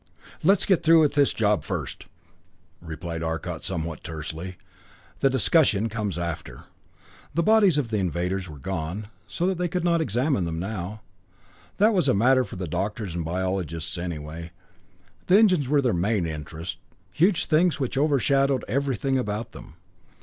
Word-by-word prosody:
"Let's 190 +3 +4
get 190 -4 +3
through 165 0 +6
with 150 -2 +3
this 145 -1 +4
job 105 -2 +1
first," - - -5 0.7
replied 85 0 -6
Arcot 80 0 -4
somewhat 85 -3 -3
tersely. 80 +2 -6 0.6
"The 135 - +4
discussion 115 - +3
comes 105 -4 -3
after." 80 -7 -5 0.7
The 170 - +2
bodies 205 -5 +5
of 135 -6 0
the 110 -2 0
invaders 90 +1 -2
were 75 - -9
gone, 95 +7 -4 0.2
so 185 +3 0
they 180 0 -1
could 180 0 -2
not 170 -1 +2
examine 125 - 0
them 80 -1 -3
now. 100 +3 -5 0.8
That 215 +3 +4
was 185 -4 +2
a - - +3
matter 130 +5 +4
for 115 - -9
the 90 -1 -4
doctors 95 +3 -3
and 85 -1 -3
biologists, 85 -2 -3
anyway. 85 -1 -6 0.8
The 185 - +6
engines 185 - +4
were 145 +1 +2
their 125 - +2
main 95 +2 +1
interest, 80 +2 -6 0.3
huge 180 +2 +2
things 160 +1 +2
which 130 -2 -2
overshadowed 140 -1 +2
everything 135 0 0
about 105 -1 -3
them. 80 - -12
105 Hz, 155 wpm, -25 LUFS, 85-145 Hz, 0.8 s, through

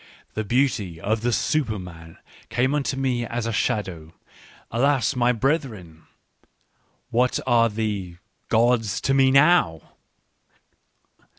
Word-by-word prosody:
The 110 - -2
beauty 110 -7 0
of 110 +5 -1
the 120 +1 0
Superman 90 - -3 0.3
came 125 +4 0
unto 140 -2 -1
me 130 -3 -1
as 115 0 -4
a 115 - -2
shadow. 95 -9 -2 0.6
Alas, 130 +1 +1
my 125 0 +2
brethren! 115 - -3 1.0
What 125 +2 +1
are 120 -2 +3
the 105 -5 -4 0.2
— - - -47
gods 115 -2 +2
to 135 - +1
me 135 -1 +4
now 135 - +3
115 Hz, 115 wpm, -23 LUFS, 100-130 Hz, 1.0 s, me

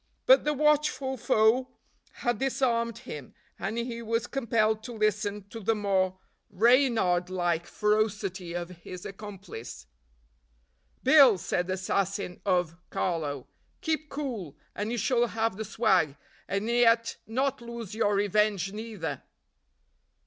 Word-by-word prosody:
But - - +6
the 300 - +2
watchful 290 -3 +2
foe 225 +2 +3 0.4
had 240 -3 -2
disarmed 235 -4 0
him, 235 - -9 0.2
and 220 +4 -3
he 235 0 -3
was 230 +1 -1
compelled 225 -4 +1
to 245 - -6
listen 210 -2 -1
to 225 - -7
the 225 +2 +1
more 190 -3 +1 0.3
reynard 220 -5 +3
like 175 -2 -1
ferocity 210 -4 0
of 175 0 -3
his 180 +1 -9
accomplice. 195 - -8 1.2
"Bill," 265 -6 +7
said 180 +1 -1
the 185 - -1
assassin 190 0 -2
of 175 -3 +1
Carlo, 150 -7 -2 0.4
"keep 315 -3 -1
cool, 245 - -5 0.2
and 210 +2 -3
you 240 - -1
shall 240 +2 +2
have 225 -2 -1
the 220 - -4
swag; 190 -10 +2 0.3
and 200 +3 -1
yet 230 -1 +3
not 265 +3 -1
lose 235 -4 -7
your 205 -2 +1
revenge 205 -1 +1
neither." 210 - -5
215 Hz, 125 wpm, -28 LUFS, 185-235 Hz, 1.2 s, Bill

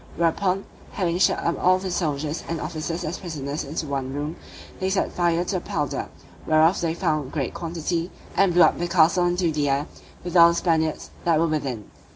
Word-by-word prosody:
Whereupon, 180 +3 +1 0.3
having 175 -3 -1
shut - - +4
up 170 - -2
all 185 +1 +5
the 185 0 -4
soldiers 155 -3 -2
and 165 -1 -2
officers 165 +2 -4
as 155 - -4
prisoners 150 -5 -4
into 150 +2 -4
one 135 -2 -3
room, 145 +4 -4 0.4
they 190 - 0
set 190 0 0
fire 175 0 +1
to 190 - -2
the - - -4
powder 150 -4 -3 0.4
(whereof 160 +3 +4
they 165 -1 0
found 155 -6 -1
great 140 -5 -2
quantity) 170 +1 -3 0.3
and 195 -2 +4
blew 175 0 +6
up - - +3
the 175 - -1
castle 175 +1 +4
into 175 -1 +1
the 150 -2 0
air, 140 +2 +1 0.4
with 175 0 -5
all 170 -1 +9
the 170 - 0
Spaniards 160 -3 0
that 165 -2 +3
were 165 - +3
within. 135 -9 -3
165 Hz, 200 wpm, -24 LUFS, 155-175 Hz, 0.4 s, all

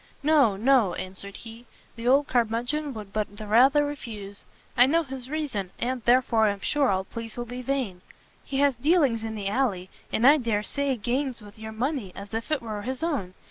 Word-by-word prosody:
"No, 285 -9 +4
no," 230 -3 +3
answered 190 +2 -6
he, 230 +1 -11 0.3
"the 230 +1 -5
old 275 +3 +5
curmudgeon 245 +5 0
would 205 -2 -8
but 210 -1 -3
the 215 - -7
rather 265 +7 +5
refuse. 215 -8 -7 0.3
I 245 - +6
know 330 +4 +3
his 265 -3 -7
reason, 275 -11 -3
and 250 +1 -2
therefore 235 -3 +4
am 200 -1 -2
sure 285 -3 +2
all 190 -1 +1
pleas 230 +3 -7
will 240 - -3
be 245 +2 -6
vain. 250 -9 -2 0.4
He 270 - -4
has 285 -2 +4
dealings 270 -4 +2
in 220 -1 -4
the 200 -2 -4
alley, 200 -5 -1 0.2
and 230 - +1
I 290 +3 +8
dare 225 -6 -1
say 280 +2 -1
games 245 +2 -2
with 205 +2 -14
your 220 0 -7
money 235 - -2
as 200 +2 -9
if 225 0 -3
it 305 -5 0
were 215 -2 -4
his 260 +6 -4
own. 245 - -2
235 Hz, 200 wpm, -26 LUFS, 210-270 Hz, 0.4 s, I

